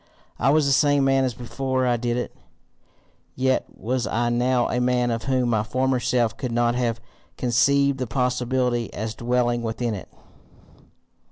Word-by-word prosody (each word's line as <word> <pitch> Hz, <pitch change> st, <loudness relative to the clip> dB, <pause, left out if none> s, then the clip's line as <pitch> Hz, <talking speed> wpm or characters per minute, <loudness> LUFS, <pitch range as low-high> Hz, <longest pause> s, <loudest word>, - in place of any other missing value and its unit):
I 130 Hz, -, +3 dB
was 150 Hz, +1 st, +4 dB
the 140 Hz, -, +2 dB
same 145 Hz, 0 st, +3 dB
man 135 Hz, 0 st, +3 dB
as 125 Hz, -3 st, -2 dB
before 130 Hz, +2 st, -2 dB
I 120 Hz, -1 st, +2 dB
did 120 Hz, 0 st, -1 dB
it, 125 Hz, -, -4 dB, 1.0 s
yet 130 Hz, 0 st, +1 dB
was 125 Hz, +2 st, -2 dB
I 120 Hz, +1 st, 0 dB
now 120 Hz, +1 st, +1 dB
a 125 Hz, -, -1 dB
man 125 Hz, -1 st, +1 dB
of 115 Hz, 0 st, -3 dB
whom 130 Hz, -2 st, +1 dB
my 110 Hz, -3 st, +2 dB
former 130 Hz, +4 st, 0 dB
self 120 Hz, -2 st, +1 dB
could 125 Hz, -3 st, -4 dB
not 120 Hz, 0 st, +2 dB
have 120 Hz, -2 st, -1 dB, 0.4 s
conceived 140 Hz, +3 st, +2 dB
the 130 Hz, -, -2 dB
possibility 125 Hz, 0 st, 0 dB
as 110 Hz, +1 st, -3 dB
dwelling 120 Hz, 0 st, 0 dB
within 115 Hz, 0 st, -2 dB
it. 100 Hz, -, -7 dB
125 Hz, 165 wpm, -23 LUFS, 120-130 Hz, 1.0 s, was